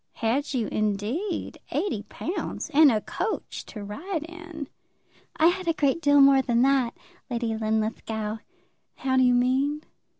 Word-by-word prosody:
"Had 265 +6 -1
you, 235 -3 +1
indeed; 215 - -2
eighty 370 - -1
pounds; 355 +5 -4
and 295 -1 +7
a 215 -2 +1
coach 425 - -4
to 210 - -8
ride 310 - -4
in!" 330 -3 -8 0.7
"I 315 - +4
had 370 0 -3
a 330 - +3
great 295 +1 +1
deal 285 -2 +5
more 275 -1 +7
than 240 -2 +2
that, 265 -3 +2 0.3
Lady 235 -2 -1
Linlithgow." 220 0 -2 0.6
"How 260 -1 -1
do 260 - +5
you 250 -1 +5
mean?" 270 +5 +1
265 Hz, 145 wpm, -26 LUFS, 225-315 Hz, 0.7 s, and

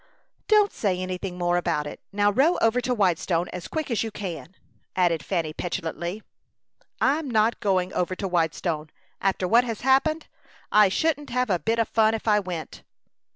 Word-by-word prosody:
"Don't 420 -2 +4
say 195 -4 0
anything 185 0 -4
more 175 0 +1
about 170 -4 -1
it. 145 - -7
Now 205 0 +2
row 285 - +3
over 225 +2 +2
to 250 - -2
Whitestone 180 -5 +1
as 180 - -7
quick 315 -4 -3
as 230 - +1
you 225 - -2
can," 190 -3 -7 0.4
added 170 -4 +2
Fanny, 165 -5 -2
petulantly. 175 +3 -4 0.8
"I'm 285 +2 +1
not 220 0 +2
going 185 -4 0
over 180 +1 -1
to 195 - -3
Whitestone, 165 -2 -1 0.3
after 190 -1 0
what 235 +5 +5
has 230 -3 -5
happened. 275 +5 +2 0.5
I 210 -2 +6
shouldn't 295 +6 0
have 250 -2 0
a 180 - +2
bit 225 +5 0
of 230 -1 +1
fun 220 0 +3
if 225 - -7
I 210 -1 +5
went." 175 -6 -6
200 Hz, 175 wpm, -25 LUFS, 175-235 Hz, 0.8 s, I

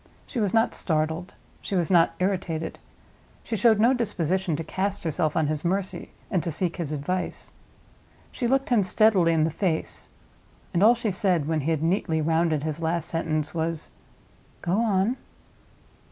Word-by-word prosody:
She 250 - -4
was 205 -4 +1
not 225 +2 +2
startled; 160 +2 -1 0.3
she 200 - -3
was 175 -1 0
not 170 -2 +4
irritated; 180 -4 -2 0.6
she 225 - -3
showed 220 +1 +4
no 235 +4 +5
disposition 190 - 0
to 165 - -3
cast 190 +5 -2
herself 160 -1 0
on 160 - +3
his 150 0 -2
mercy, 185 +2 -2 0.2
and 180 - +2
to 170 - -3
seek 170 +3 -1
his 165 -4 -3
advice. 180 +5 -3 0.8
She 245 - -2
looked 270 +2 +1
him 235 -5 +4
steadily 190 -3 +4
in 160 -2 +3
the 160 - +1
face; 170 -2 -2 0.6
and 170 - +1
all 225 +4 +7
she 230 -3 -1
said, 180 -6 +1
when 160 -1 0
he 145 - -2
had 160 -1 0
neatly 165 -2 +1
rounded 160 -1 +1
his 155 +1 -3
last 165 0 -1
sentence, 155 -2 -1
was—"Go 165 +1 -6
on." 220 +2 +1
175 Hz, 165 wpm, -26 LUFS, 160-200 Hz, 0.8 s, all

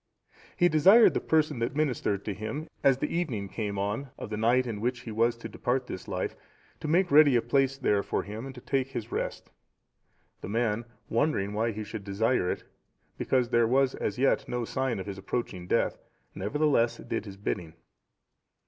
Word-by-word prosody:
He 175 - +5
desired 190 +9 +7
the - - +1
person 155 -6 +1
that 115 +3 -2
ministered 125 -9 0
to 105 - -2
him, 110 - -5 0.2
as 135 -2 +5
the 135 - -2
evening 125 - -2
came 100 0 -4
on 105 +8 -2
of - - -7
the - - -1
night 120 +4 +3
in 110 -4 -4
which 125 +1 -1
he 115 - -7
was 115 +2 +2
to 115 - -7
depart 125 +1 -1
this 95 - -7
life, 90 -2 -3 0.4
to - - -5
make 175 +3 +2
ready 145 -2 +7
a 120 - +4
place 135 +3 +2
there 105 -7 +2
for - - -2
him 110 +6 -6
to 130 - -11
take 135 0 0
his 120 -2 -5
rest. - - -4 0.9
The - - -6
man, 115 0 0 0.2
wondering 115 -6 0
why 115 +2 0
he 110 0 -5
should 105 0 -7
desire 100 0 +1
it, - - -3 0.6
because 125 -2 +1
there 120 -2 +3
was 130 +2 +3
as 100 - -3
yet 135 +2 +2
no 120 -1 -2
sign 130 -1 -1
of 95 - -5
his 100 -1 -6
approaching 95 -3 -4
death, - - +1 0.3
nevertheless 120 +3 +1
did 115 -2 -4
his 100 -2 -9
bidding. 85 -5 -4
120 Hz, 190 wpm, -28 LUFS, 105-135 Hz, 0.9 s, desired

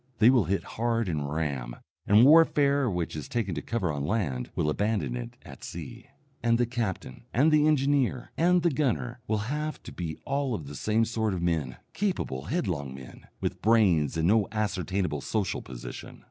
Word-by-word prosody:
They 115 +3 +6
will 120 -7 +3
hit 95 +4 0
hard 115 -1 -1
and 75 -4 -2
ram, 70 -6 -2 0.3
and 105 +4 +7
warfare 145 -3 +5
which 90 -5 -2
is 75 -3 -6
taking 110 -6 -1
to 75 - -3
cover 100 -5 -1
on 70 -1 -3
land 75 - -1
will - - 0
abandon 85 - 0
it - - -6
at - - -12
sea. - - -8 0.3
And 115 0 +3
the 120 - +2
captain, 115 - -4
and 145 +6 +3
the 150 0 +4
engineer, 140 -4 +1
and 175 +1 +3
the 170 - +3
gunner 125 -3 -1
will 110 -1 -1
have 150 +1 -4
to - - -9
be 80 -3 -5
all 140 -3 -1
of 80 - -6
the 70 - -8
same 110 +9 +1
sort 110 -3 -1
of 85 - -3
men: 75 -7 -1 0.2
capable, 175 - -2
headlong 85 - -2
men, 65 -2 -12
with - - -3
brains 95 - +3
and 80 +1 +2
no 105 0 +3
ascertainable 95 -7 -1
social 105 +2 -1
position. 60 -2 -9
105 Hz, 185 wpm, -28 LUFS, 80-125 Hz, 0.3 s, and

